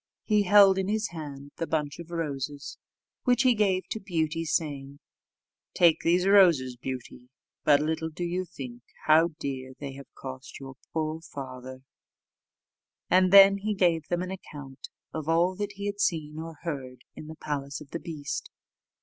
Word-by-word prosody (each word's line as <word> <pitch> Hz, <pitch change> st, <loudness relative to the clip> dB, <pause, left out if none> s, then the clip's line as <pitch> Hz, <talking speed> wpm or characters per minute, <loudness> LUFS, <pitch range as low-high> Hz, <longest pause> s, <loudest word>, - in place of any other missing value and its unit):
He 210 Hz, -2 st, +3 dB
held 200 Hz, -1 st, +6 dB
in 190 Hz, -, -1 dB
his 215 Hz, +1 st, 0 dB
hand 145 Hz, -4 st, -8 dB
the 165 Hz, -, -3 dB
bunch 150 Hz, -2 st, -2 dB
of 170 Hz, -1 st, -9 dB
roses, 145 Hz, -4 st, -4 dB, 0.4 s
which 250 Hz, 0 st, +3 dB
he 255 Hz, -1 st, +5 dB
gave 195 Hz, -4 st, +1 dB
to 220 Hz, -, -2 dB
Beauty 165 Hz, -5 st, -2 dB
saying, 140 Hz, -3 st, -2 dB, 0.8 s
"Take 170 Hz, -3 st, +5 dB
these 175 Hz, +2 st, +2 dB
roses, 170 Hz, -11 st, +5 dB
Beauty; 125 Hz, 0 st, -7 dB, 0.3 s
but 145 Hz, -1 st, +5 dB
little 160 Hz, +1 st, -1 dB
do 160 Hz, +3 st, -6 dB
you 180 Hz, +2 st, -2 dB
think 130 Hz, -8 st, -9 dB, 0.2 s
how 160 Hz, +1 st, +4 dB
dear 130 Hz, -1 st, -5 dB
they 140 Hz, -2 st, -6 dB
have 140 Hz, 0 st, -12 dB
cost 130 Hz, 0 st, -8 dB
your 135 Hz, -1 st, -9 dB, 0.2 s
poor 160 Hz, 0 st, -2 dB
father;" 130 Hz, -3 st, -9 dB, 1.3 s
and 185 Hz, 0 st, +5 dB
then 195 Hz, 0 st, +9 dB
he 210 Hz, +1 st, -2 dB
gave 170 Hz, -5 st, +2 dB
them 175 Hz, 0 st, -1 dB
an 185 Hz, -, -5 dB
account 145 Hz, -8 st, -9 dB, 0.2 s
of 155 Hz, -1 st, -4 dB
all 170 Hz, +3 st, +3 dB
that 205 Hz, 0 st, -3 dB
he 200 Hz, 0 st, -6 dB
had 205 Hz, 0 st, -3 dB
seen 155 Hz, -5 st, -1 dB
or 165 Hz, 0 st, -7 dB
heard 135 Hz, -6 st, -5 dB
in 155 Hz, -, -9 dB
the 160 Hz, -, -8 dB
palace 140 Hz, -3 st, -4 dB
of 145 Hz, -2 st, -13 dB
the 170 Hz, -, -4 dB
beast. 150 Hz, -5 st, -5 dB
160 Hz, 165 wpm, -27 LUFS, 140-185 Hz, 1.3 s, then